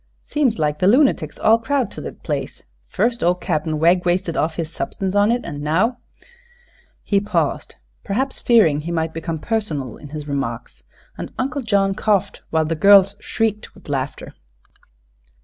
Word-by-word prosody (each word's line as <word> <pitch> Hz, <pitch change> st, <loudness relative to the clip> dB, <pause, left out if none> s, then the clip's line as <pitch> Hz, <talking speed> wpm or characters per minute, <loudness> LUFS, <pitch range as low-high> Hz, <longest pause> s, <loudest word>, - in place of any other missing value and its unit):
Seems 275 Hz, -7 st, 0 dB
like 150 Hz, -1 st, 0 dB
the 185 Hz, -, +3 dB
lunatics 260 Hz, +6 st, +3 dB
all 225 Hz, +1 st, +4 dB
crowd 260 Hz, +2 st, -1 dB
to -, -, -8 dB
thet -, -, -9 dB
place -, -, -4 dB, 0.2 s
fust 235 Hz, +4 st, 0 dB
ol' 175 Hz, +1 st, +3 dB
Cap'n 155 Hz, -3 st, -2 dB
Wegg 175 Hz, +3 st, +3 dB
wasted 175 Hz, -1 st, 0 dB
of 160 Hz, +1 st, 0 dB
his 165 Hz, -2 st, -4 dB
substance 190 Hz, +2 st, -3 dB
on 205 Hz, +2 st, +4 dB
it, 245 Hz, +1 st, -1 dB
an' 145 Hz, 0 st, -6 dB
now 190 Hz, +12 st, +1 dB, 0.5 s
" 485 Hz, 0 st, -33 dB
He 200 Hz, -, +2 dB
paused, 180 Hz, -8 st, -2 dB, 0.3 s
perhaps 260 Hz, +7 st, -1 dB
fearing 205 Hz, -12 st, +4 dB
he 165 Hz, +3 st, -5 dB
might 160 Hz, -1 st, -1 dB
become 165 Hz, 0 st, -4 dB
personal 155 Hz, -, -3 dB
in 145 Hz, -, -12 dB
his 150 Hz, 0 st, -7 dB
remarks, 135 Hz, -5 st, -4 dB, 0.3 s
and -, -, -6 dB
Uncle 275 Hz, +2 st, -2 dB
John 200 Hz, -4 st, +1 dB
coughed 200 Hz, -1 st, 0 dB
while 160 Hz, -1 st, +1 dB
the 160 Hz, -, -1 dB
girls 195 Hz, +4 st, +6 dB
shrieked 220 Hz, -2 st, -2 dB
with 195 Hz, -, -15 dB
laughter. 135 Hz, -1 st, -4 dB
185 Hz, 165 wpm, -20 LUFS, 155-225 Hz, 0.5 s, girls